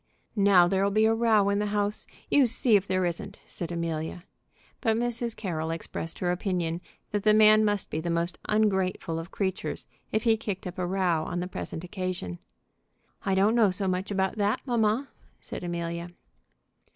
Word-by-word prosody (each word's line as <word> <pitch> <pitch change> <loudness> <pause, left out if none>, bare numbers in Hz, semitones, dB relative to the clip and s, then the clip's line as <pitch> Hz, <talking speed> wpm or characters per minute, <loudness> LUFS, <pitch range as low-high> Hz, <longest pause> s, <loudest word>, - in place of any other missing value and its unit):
"Now 195 -4 +6
there'll 195 +2 +2
be 215 +2 +3
a 220 - +4
row 225 -3 +3
in 200 0 +1
the 210 - 0
house; 205 0 -1 0.2
you 280 -3 +6
see 235 -1 +2
if 200 -1 +2
there 185 -1 +1
isn't!" 170 -1 -4
said 170 -1 -5
Amelia. 165 0 -3 0.6
But 225 -3 +2
Mrs. 235 -1 -1
Carroll 160 -5 -3
expressed 165 0 -4
her 175 -1 0
opinion 180 -2 -1 0.3
that 205 - 0
the 215 +1 +4
man 215 0 +7
must 205 -2 0
be 155 - -2
the 170 - -3
most 170 0 -1
ungrateful 190 -6 +1
of 165 +2 -7
creatures 190 -2 -3 0.3
if 220 - 0
he 225 -2 +4
kicked 205 -3 -4
up 180 0 -6
a 180 - 0
row 180 -4 +1
on 175 +1 -3
the 175 - -2
present 170 -2 -5
occasion. 180 - -4 0.9
"I 190 - +3
don't 200 +3 +4
know 230 -4 +5
so 190 +1 -1
much 185 +1 -1
about 190 0 0
that, 205 0 +1
mamma," 235 +1 +1 0.3
said - - -7
Amelia. 170 0 -3
190 Hz, 180 wpm, -27 LUFS, 175-215 Hz, 0.9 s, man